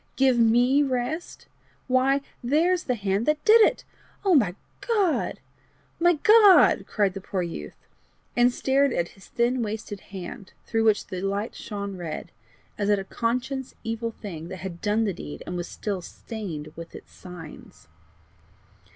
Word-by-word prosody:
Give 260 -2 +3
ME 245 +5 +4
rest! 275 +5 -2 0.4
why 265 +2 +2 0.2
there's 335 +8 +2
the 250 - 0
hand 200 0 -1
that 300 0 +1
did 450 +1 +8
it! - - +3 0.4
O 385 - +4
my 210 - +3 0.3
God! 410 -8 +1 0.6
my 350 +1 +5
God!" 410 +4 +6
cried 200 -3 +1
the 195 - -6
poor 190 -1 -2
youth, 120 - -7 0.6
and 245 +1 +5
stared 270 +2 +2
at 170 0 -1
his 195 - -17
thin 240 +1 0
wasted 210 -2 -4
hand, 195 +2 -9
through 225 -1 0
which 215 -2 +3
the 185 -1 -6
light 200 +3 -2
shone 200 -3 -6
red, 170 -3 -6 0.5
as 205 0 0
at 205 - +4
a 195 - -3
conscious 250 +5 -3
evil 225 +1 -2
thing 175 -8 -8
that 185 0 -8
had 175 -3 -7
done 215 +1 +1
the 200 -3 0
deed, 75 - -8
and - - -5
was 175 0 -3
still 200 -3 -4
stained 170 -8 -7
with 165 0 -10
its - - -12
signs. 175 -4 -12
225 Hz, 160 wpm, -25 LUFS, 190-265 Hz, 0.6 s, did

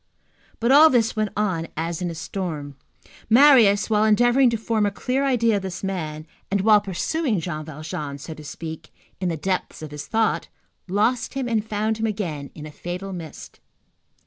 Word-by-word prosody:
But 235 +2 +2
all 305 +3 +8
this 235 -4 +2
went 215 -1 0
on 185 -6 0
as 165 +2 -3
in 180 - -1
a 165 - -6
storm. 155 -5 -5 0.5
Marius, 230 -5 +6
while 215 -1 +2
endeavoring 240 +4 +4
to 230 - -1
form 220 -1 0
a - - +2
clear 255 +7 -1
idea 230 -5 +2
of - - -3
this 190 -1 -6
man, 155 -5 -4 0.2
and 200 -1 +1
while 210 0 +5
pursuing 215 - -1
Jean 155 -2 -4
Valjean, 150 -2 -6
so 150 +3 -8
to 155 - -12
speak, 160 +1 -8 0.3
in 185 -1 -1
the 165 - -2
depths 185 0 -3
of 155 - -7
his 150 -1 -7
thought, 225 -1 0 0.4
lost 225 +7 0
him 265 -2 -2
and 225 -3 0
found 215 0 -1
him 225 - 0
again 170 -10 -4
in 150 - -8
a 155 - -8
fatal 180 +5 -6
mist. 165 -4 -9
200 Hz, 185 wpm, -23 LUFS, 165-225 Hz, 0.5 s, all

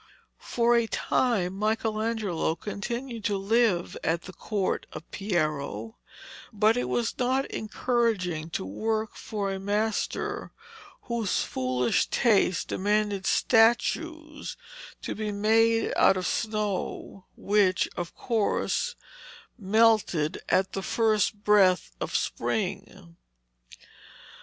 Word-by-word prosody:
For 240 0 +2
a 235 -1 +2
time 210 -7 0
Michelangelo 215 -4 -1
continued 235 +5 -5
to 205 -3 +1
live 200 -3 +1
at 165 +1 0
the 185 - -10
court 200 -1 -2
of - - -7
Piero, 150 - -2 0.5
but 215 +2 +3
it 245 - -1
was 235 -1 -1
not 260 +2 +1
encouraging 215 -8 -1
to 125 - -3
work 220 - -2
for 200 -2 -3
a 190 - -4
master 210 +3 -2 0.5
whose 235 -5 -1
foolish 125 -1 0
taste 205 - +2
demanded 205 -1 0
statues 295 +7 +1 0.5
to - - -3
be 215 0 -3
made 225 +2 +2
out 190 - +5
of 185 - -3
snow, 210 -3 -3
which, 200 -2 +2
of 175 -1 -5
course, 255 - 0 0.6
melted 210 -7 +2
at 190 0 +2
the 195 - -2
first 215 -1 +1
breath 190 - +4
of - - -3
spring. 85 0 -3
210 Hz, 105 wpm, -27 LUFS, 185-230 Hz, 0.6 s, out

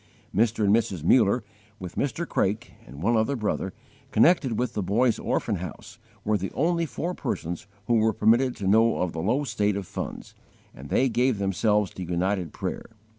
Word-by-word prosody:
Mr. 110 0 +2
and 100 +2 +5
Mrs. 100 -8 -1
Muller, 115 +4 +4 0.3
with 90 -3 -7
Mr. 145 +5 -2
Craik 100 +3 -1 0.2
and 70 +6 -9
one 115 +4 +3
other 110 +5 +1
brother, 105 -4 -2 0.4
connected 130 -2 +3
with 125 0 -1
the 105 - -1
Boys' 110 +6 +2
Orphan - - -1
House, - - -8 0.2
were 105 -1 +1
the 95 - -4
only 170 +2 +1
four 165 +8 -3
persons 85 - -4 0.2
who 120 +2 +3
were 110 +1 +3
permitted 120 +5 +3
to 100 - -4
know 115 +3 +4
of 90 -2 -1
the 80 - -3
low 120 - +1
state 105 -5 0
of 100 - -4
funds; - - -6 0.4
and 70 +2 -11
they 135 - +3
gave 125 -1 +1
themselves 100 +1 +1
to 95 - -7
united 90 +1 -1
prayer. - - -5
110 Hz, 180 wpm, -26 LUFS, 95-120 Hz, 0.4 s, and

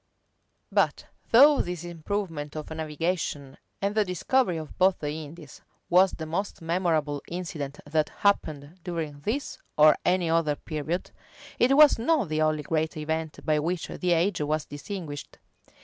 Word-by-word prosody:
But - - +1 0.2
though 280 +5 +7
this 175 -1 -4
improvement 170 -3 -4
of 155 0 -6
navigation, 160 -3 -3 0.2
and 200 +1 +1
the 215 0 +3
discovery 185 +2 +1
of 155 -2 -7
both 185 0 +4
the 145 -1 -3
Indies, 155 0 -9 0.3
was 185 +2 +6
the 160 - -5
most 185 +6 -3
memorable 165 -4 0
incident 160 -5 -5
that 155 +1 0
happened 155 -5 -1
during 160 -5 -4
this 225 - -3 0.2
or 155 0 +7
any 180 -1 +2
other 165 -2 +2
period, 155 +4 -4 0.5
it 270 +3 +4
was 300 -5 +7
not 280 - +1
the 155 0 0
only 155 -1 +1
great 160 +1 -1
event 160 0 -3
by 155 -1 +2
which 170 +3 -2
the 180 -1 0
age 175 +1 +1
was 150 +1 -1
distinguished. 145 -1 -7
165 Hz, 150 wpm, -27 LUFS, 150-185 Hz, 0.5 s, though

